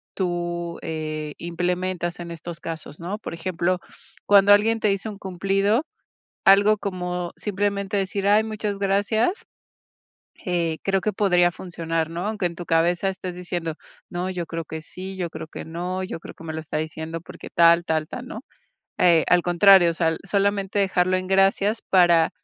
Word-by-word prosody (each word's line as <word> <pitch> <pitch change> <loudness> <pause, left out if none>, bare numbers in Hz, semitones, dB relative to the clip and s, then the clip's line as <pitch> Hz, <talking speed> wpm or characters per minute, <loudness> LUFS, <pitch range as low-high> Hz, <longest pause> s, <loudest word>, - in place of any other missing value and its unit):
tú, 175 -2 -2
eh, 155 -2 -4
implementas 180 +1 -2
en 170 0 -6
estos 170 +1 -7
casos, 160 -3 -7
¿no? 180 +5 -4
Por 210 - -7
ejemplo, 175 +1 -1 0.5
cuando 200 0 +7
alguien 225 +2 +3
te 210 - +3
hizo 195 +3 -4
un 205 - -8
cumplido, 195 - 0 0.6
algo 205 +2 +6
como 180 -3 -3
simplemente 200 0 -1
decir: 195 +1 -2
"Ay 210 +1 +5
muchas 215 -2 -3
gracias". 205 - +1 1.0
Eh, 170 -3 0
creo 195 -1 +1
que 215 - 0
podría 180 -3 +3
funcionar, 165 -3 -3
¿no? 170 +3 -4
Aunque 210 -4 -1
en 170 - -3
tu 175 - -6
cabeza 170 +3 +2
estés 185 -1 -6
diciendo: 175 -2 -4 0.4
"No, 180 +1 -3
yo 180 -2 -3
creo 165 0 -4
que 160 +1 -7
sí, 185 +4 -8
yo 175 -3 -3
creo - - -7
que - - -8
no, 180 +3 -4
yo 185 - -5
creo - - -10
que 165 - -13
me 160 - -5
lo 160 - -3
está 155 -1 -4
diciendo 160 +1 -5
porque - - -11
tal, 170 0 +6
tal, 155 -2 0
tal, 250 - -7
¿no?". 220 - -7 0.6
Eh, 170 -3 +5
al 180 -1 +4
contrario, 175 0 +6
o - - -3
sea, 165 -1 +1
solamente 200 0 0
dejarlo 185 -1 +2
en: 185 0 -3
"Gracias". 195 +3 +3
Para, 175 -3 +5
180 Hz, 175 wpm, -24 LUFS, 170-195 Hz, 1.0 s, cuando